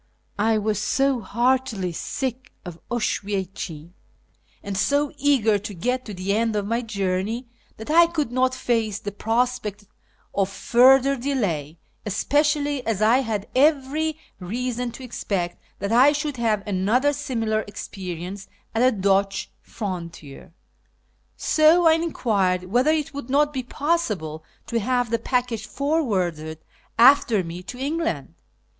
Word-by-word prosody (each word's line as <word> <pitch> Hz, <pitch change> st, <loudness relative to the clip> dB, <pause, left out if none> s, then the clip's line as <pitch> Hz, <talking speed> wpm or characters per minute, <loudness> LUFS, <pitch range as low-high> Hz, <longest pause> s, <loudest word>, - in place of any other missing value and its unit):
I 220 Hz, +1 st, +3 dB
was 210 Hz, -1 st, -1 dB
so 270 Hz, +3 st, +1 dB
heartily 235 Hz, -3 st, 0 dB
sick 255 Hz, +8 st, -4 dB
of 175 Hz, -2 st, -8 dB
Oswiecim, 195 Hz, -7 st, -3 dB, 0.7 s
and 200 Hz, -1 st, -4 dB
so 285 Hz, +8 st, +1 dB
eager 260 Hz, -8 st, +3 dB
to 205 Hz, +1 st, -7 dB
get 250 Hz, +8 st, -1 dB
to 210 Hz, -, -7 dB
the 185 Hz, +2 st, -1 dB
end 225 Hz, 0 st, +1 dB
of 205 Hz, -1 st, -1 dB
my 230 Hz, +3 st, 0 dB
journey, 205 Hz, +2 st, -2 dB, 0.3 s
that 220 Hz, +7 st, -6 dB
I 335 Hz, +1 st, +7 dB
could 310 Hz, -7 st, -2 dB
not 255 Hz, +1 st, +1 dB
face 225 Hz, -5 st, 0 dB
the 205 Hz, -, -5 dB
prospect 225 Hz, -1 st, -1 dB, 0.5 s
of 195 Hz, -1 st, +1 dB
further 260 Hz, +6 st, +5 dB
delay, 200 Hz, -, -2 dB, 0.3 s
especially 290 Hz, -, +1 dB
as 215 Hz, -2 st, 0 dB
I 230 Hz, +4 st, +5 dB
had 220 Hz, -5 st, -2 dB
every 300 Hz, +2 st, +2 dB, 0.2 s
reason 240 Hz, +5 st, -3 dB
to 265 Hz, -, -10 dB
expect 195 Hz, -7 st, -3 dB, 0.2 s
that 200 Hz, -, -3 dB
I 260 Hz, +5 st, +6 dB
should 295 Hz, -2 st, -3 dB
have 215 Hz, -4 st, 0 dB
another 215 Hz, +9 st, +2 dB
similar 235 Hz, -7 st, -1 dB
experience 190 Hz, -1 st, -7 dB, 0.3 s
at 225 Hz, -, 0 dB
the 255 Hz, +2 st, +5 dB
Dutch 195 Hz, 0 st, +1 dB
frontier; 170 Hz, -10 st, -7 dB, 0.9 s
so 320 Hz, +3 st, +4 dB
I 325 Hz, -, +7 dB
enquired 210 Hz, -, 0 dB
whether 245 Hz, +10 st, +2 dB
it 310 Hz, -2 st, 0 dB
would 280 Hz, -3 st, -7 dB
not 295 Hz, +2 st, +2 dB
be 265 Hz, -, -2 dB
possible 230 Hz, -, -2 dB, 0.2 s
to 230 Hz, 0 st, -1 dB
have 245 Hz, +1 st, 0 dB
the 230 Hz, -, +1 dB
package 245 Hz, -4 st, -1 dB
forwarded 185 Hz, -, -1 dB, 0.4 s
after 235 Hz, -4 st, +6 dB
me 170 Hz, +1 st, -7 dB
to 220 Hz, +7 st, -9 dB
England. 320 Hz, +5 st, -2 dB
230 Hz, 135 wpm, -23 LUFS, 195-270 Hz, 0.9 s, I